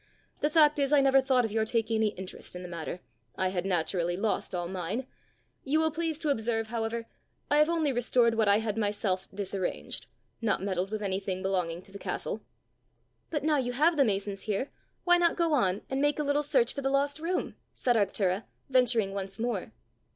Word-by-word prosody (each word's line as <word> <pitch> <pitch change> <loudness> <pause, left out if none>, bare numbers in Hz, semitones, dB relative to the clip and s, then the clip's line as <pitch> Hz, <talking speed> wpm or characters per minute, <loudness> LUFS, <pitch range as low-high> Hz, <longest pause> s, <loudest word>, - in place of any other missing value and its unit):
The 295 - +1
fact 300 -1 +5
is 275 0 +1
I 295 - +6
never 270 0 +5
thought 260 -2 +3
of 220 - -4
your 220 0 +1
taking 225 0 0
any 220 0 +3
interest 190 -3 -6
in 180 - -6
the - - -6
matter; 170 +1 -5 0.3
I 185 0 +1
had 185 0 -2
naturally 175 -1 0
lost 205 -2 -1
all 175 -1 -2
mine. 190 +7 -3 0.6
You 295 +3 +2
will 320 0 +2
please 320 0 -2
to 300 - +1
observe, 225 -3 -1
however, 230 0 -2 0.5
I 295 - +5
have 300 +2 +5
only 320 -4 +1
restored 245 -1 +3
what 220 -2 +2
I 200 0 +6
had 220 0 -2
myself 205 -3 -1
disarranged 195 -2 -4 0.3
not 225 - +1
meddled 190 -1 -1
with 215 0 -3
anything 190 -1 -2
belonging 180 -3 -1
to 195 - -18
the 200 - -9
castle!" - - -3 0.9
"But 300 -3 -2
now 305 -1 +3
you 245 -2 -1
have 315 +6 +3
the 285 - +5
masons 200 -3 -1
here, 215 +6 -2 0.3
why 350 0 +5
not 340 -1 +3
go 335 -2 +2
on, 200 -7 +2
and 265 +1 -1
make 290 0 +2
a 300 - 0
little 285 0 +2
search 470 - +2
for 280 - -4
the 270 - 0
lost 280 +2 +1
room?" 345 +3 -2 0.2
said 245 -2 +1
Arctura, 195 -1 +1 0.3
venturing 235 -6 +3
once 195 -1 -4
more. 230 -5 -2
225 Hz, 200 wpm, -29 LUFS, 195-280 Hz, 0.9 s, I